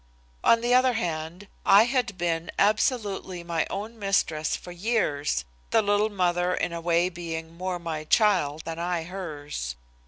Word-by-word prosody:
On 230 - +5
the 240 +1 +2
other 255 0 +5
hand, 170 -2 -3 0.2
I 200 +2 +7
had 240 -5 0
been 170 -1 -1
absolutely 205 -4 +1
my 170 -2 -1
own 220 +3 -5
mistress 165 -6 +1
for 180 - -9
years, 175 - 0 0.2
the - - +3
little 205 +1 +2
mother 180 -2 +1
in 170 - -2
a 170 - -4
way 170 +1 +2
being 165 -2 -6
more 185 +1 -3
my 160 -3 -5
child 170 -7 +2
than 165 0 -5
I 175 -1 -1
hers. 150 - -5
175 Hz, 155 wpm, -26 LUFS, 165-205 Hz, 0.2 s, I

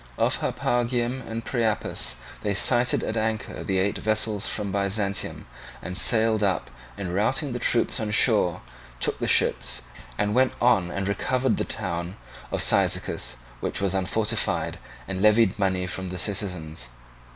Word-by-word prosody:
Off - - +2
Harpagium 120 +1 0
and 115 0 -5
Priapus 115 -4 -1 0.3
they 105 -1 -1
sighted 120 +5 +3
at 110 - -2
anchor 110 0 -2
the 95 -2 -1
eight 100 +2 0
vessels 110 -1 0
from 105 -2 -3
Byzantium, 100 -1 -1 0.3
and, 90 - -6
sailing 110 +1 +4
up 95 -2 0 0.3
and 95 -3 -4
routing 130 - 0
the 120 - -3
troops 120 0 +1
on 110 -1 -2
shore, 105 -5 +3 0.4
took - - 0
the - - -1
ships, - - +2 0.3
and 105 - +1
then - - -1
went 130 +2 +3
on 100 -7 +3
and 95 +2 -3
recovered 125 +5 0
the - - -1
town 90 -2 -4 0.3
of - - 0
Cyzicus, - - +2 0.2
which - - -1
was 100 -1 0
unfortified, 95 +3 0 0.3
and 95 -1 -3
levied 105 -1 +4
money 95 -2 +1
from 95 0 -4
the 90 - -5
citizens. 90 - -2
105 Hz, 150 wpm, -25 LUFS, 95-115 Hz, 0.4 s, sailing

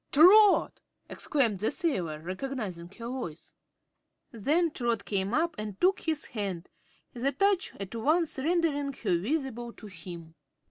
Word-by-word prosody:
"Trot!" 390 +7 +6 0.3
exclaimed 235 -10 0
the 215 - +1
sailor, 190 - -1
recognizing 185 -2 -5
her 230 +2 -8
voice. 240 -11 -6 0.8
Then 305 - +1
Trot 235 -6 -1
came 195 -1 -1
up 325 +6 +1
and 210 -2 -6
took 380 +2 +3
his 315 -2 -2
hand, 195 -6 -4 0.4
the 255 +3 0
touch 390 +6 +1
at 195 +1 -6
once 300 +6 +1
rendering 290 -2 0
her 180 -9 0
visible 240 - -2
to - - -13
him. 170 -3 -10
240 Hz, 135 wpm, -29 LUFS, 195-310 Hz, 0.8 s, Trot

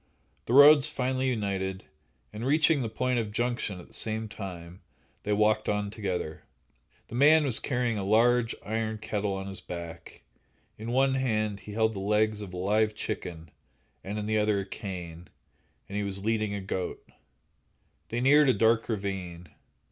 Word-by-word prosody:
The 120 - -1
roads 145 +1 +8
finally 130 -2 -1
united, 95 -4 -2 0.5
and 105 +2 -6
reaching 155 +2 +3
the 115 - -2
point 125 +2 0
of 110 -2 -3
junction 120 -4 -2
at 90 - -12
the - - -18
same 110 0 -1
time, 90 -4 -8 0.4
they 105 - -3
walked 110 +1 +2
on 105 -1 -1
together. 95 -7 -4 0.7
The - - -11
man 150 +5 +6
was 125 -5 +4
carrying 120 -5 -1
a - - -3
large 115 +3 +3
iron 110 0 -2
kettle 105 -2 -2
on 95 0 -5
his 95 -1 -5
back; 85 -1 -9 0.5
in 110 +2 -7
one 135 +2 +3
hand 110 -6 0
he 105 - -10
held 110 +1 +1
the 100 - -5
legs 105 +1 +1
of 100 -3 -7
a 90 - -7
live 105 +3 +1
chicken, 85 -6 -5 0.5
in 105 +2 -4
the 110 0 +1
other 105 -1 +1
a - - -6
cane, 90 -4 -7 0.6
and 100 - -8
he 105 - 0
was 100 0 -3
leading 110 -2 0
a 100 - -4
goat. 95 -1 -4 1.0
They 120 +1 -2
neared 145 +2 +5
a - - +5
dark 115 +1 +2
ravine. 95 -5 -4
105 Hz, 170 wpm, -28 LUFS, 95-120 Hz, 1.0 s, roads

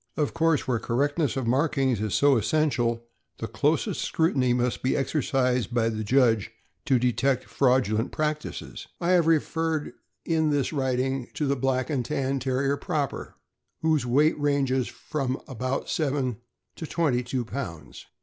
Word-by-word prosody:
Of 150 -2 0
course, 165 -4 +1
where 125 -3 +1
correctness 145 +6 0
of 130 - -1
markings 130 -2 +1
is 110 -2 -1
so 140 -1 +5
essential, 120 -1 +1 0.3
the - - -4
closest - - 0
scrutiny 140 -7 +1
must 125 0 0
be 130 - +1
exercised 125 -4 0
by 115 -1 +2
the 110 -1 -3
judge 115 -2 +3 0.4
to 135 -4 +3
detect 125 +2 +1
fraudulent 125 -4 +1
practices. 150 0 -4
I 175 +1 +1
have 175 -3 +4
referred 160 -1 0 0.3
in 160 -2 +1
this 145 0 0
writing 130 -2 -1
to 150 - -1
the 140 0 +1
Black 130 +2 0
and 135 -4 0
Tan 135 +3 -1
Terrier 135 +2 0
proper, 150 -4 -3 0.5
whose 155 -4 +2
weight 145 +6 +2
ranges 135 -3 +1
from 135 -4 -3
about 130 +1 -3
seven 135 -6 -1 0.4
to 160 - -6
twenty 145 -8 +1
two 125 0 -3
pounds. 110 - -7
135 Hz, 150 wpm, -26 LUFS, 125-150 Hz, 0.5 s, so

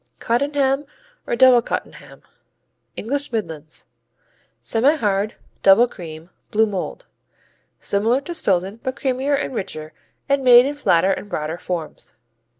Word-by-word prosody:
Cottenham 275 +3 0 0.4
or - - 0
Double 250 -1 +6
Cottenham - - -6 0.7
English 280 +5 -3
Midlands 160 -9 -5 0.8
Semihard; 225 -5 +1 0.3
double 195 +5 +6
cream; 165 -4 -10 0.2
blue 220 +1 +3
mold. 210 - -5 0.7
Similar 225 +6 +1
to 345 +5 -6
Stilton 195 - 0
but 260 0 -3
creamier 270 +2 0
and 275 - -3
richer, 155 -8 -5 0.3
and 280 -1 +1
made 245 -1 +8
in 285 - -1
flatter 190 -10 +2
and 205 - -7
broader 155 -1 -3
forms. 170 -4 -6
230 Hz, 120 wpm, -21 LUFS, 190-270 Hz, 0.8 s, made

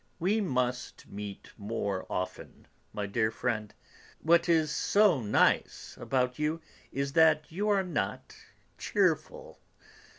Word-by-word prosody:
We 200 +6 +1
must 125 -8 -2
meet 100 -1 -8
more 100 -2 -3
often, 90 0 -5 0.3
my 105 - -3
dear 110 +2 0
friend. 110 -2 -2 0.5
What 170 +2 +4
is 160 -2 +3
so 200 -3 +3
nice 105 -2 +1
about 125 -1 0
you 155 +2 0 0.3
is 140 0 -2
that 160 -1 +4
you 205 +6 -1
are 200 -2 +3
not 180 - -3 0.4
cheerful. - - -1
140 Hz, 120 wpm, -30 LUFS, 110-170 Hz, 0.5 s, What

